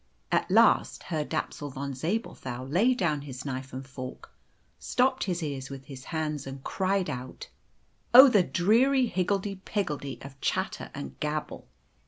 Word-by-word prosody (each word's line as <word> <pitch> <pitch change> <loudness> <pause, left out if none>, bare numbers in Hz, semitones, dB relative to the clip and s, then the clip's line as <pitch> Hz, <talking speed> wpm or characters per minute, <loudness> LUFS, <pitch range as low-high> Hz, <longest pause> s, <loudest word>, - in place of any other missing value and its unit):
At - - +1
last - - +4
Herr 155 -4 -2
Dapsul 145 0 -3
von 140 +1 -5
Zabelthau 130 - -3
laid 210 - +3
down 155 - 0
his 130 -2 -8
knife 130 -1 -4
and 130 +1 -6
fork, 130 -1 -8 0.5
stopped 260 +1 +1
his 175 -3 -2
ears 135 -3 -4
with 135 -1 -8
his 130 -3 -10
hands, 155 -4 -3
and 135 0 -8
cried 190 -1 0
out, 130 -3 -6 0.6
"Oh, 260 +3 +11
the 215 -7 +5
dreary 230 - +3
higgledy 195 -1 -1
piggledy 150 - -3
of 135 0 -11
chatter 190 +1 -1
and 140 - -7
gabble!" 150 0 -3
150 Hz, 150 wpm, -28 LUFS, 135-195 Hz, 0.6 s, Oh